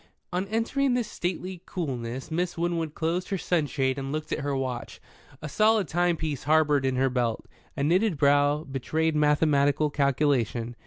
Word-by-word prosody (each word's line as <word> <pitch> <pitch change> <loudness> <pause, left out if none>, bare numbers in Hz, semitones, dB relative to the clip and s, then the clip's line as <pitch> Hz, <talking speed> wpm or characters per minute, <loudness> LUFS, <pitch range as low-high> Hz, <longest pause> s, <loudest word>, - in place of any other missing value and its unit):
On 185 +2 -1
entering 245 +5 0
the 245 - +1
stately 180 -2 -4
coolness, 130 -5 -4
Miss 175 +2 -1
Winwood 165 -2 -2
closed 170 +3 -1
her 195 - -1
sunshade 145 -6 0
and 135 0 -4
looked 155 +1 -4
at - - -1
her 140 0 -2
watch, 125 -3 -4 0.4
a - - -3
solid 215 +3 +3
timepiece 160 -5 -1
harboured 150 -3 +3
in 130 - 0
her 130 +1 +2
belt. 120 -3 -1 0.3
A 140 - 0
knitted 180 +3 +2
brow 145 +1 +3
betrayed 155 +3 -1
mathematical 150 -1 +2
calculation. 130 -5 0
150 Hz, 155 wpm, -27 LUFS, 135-175 Hz, 0.4 s, solid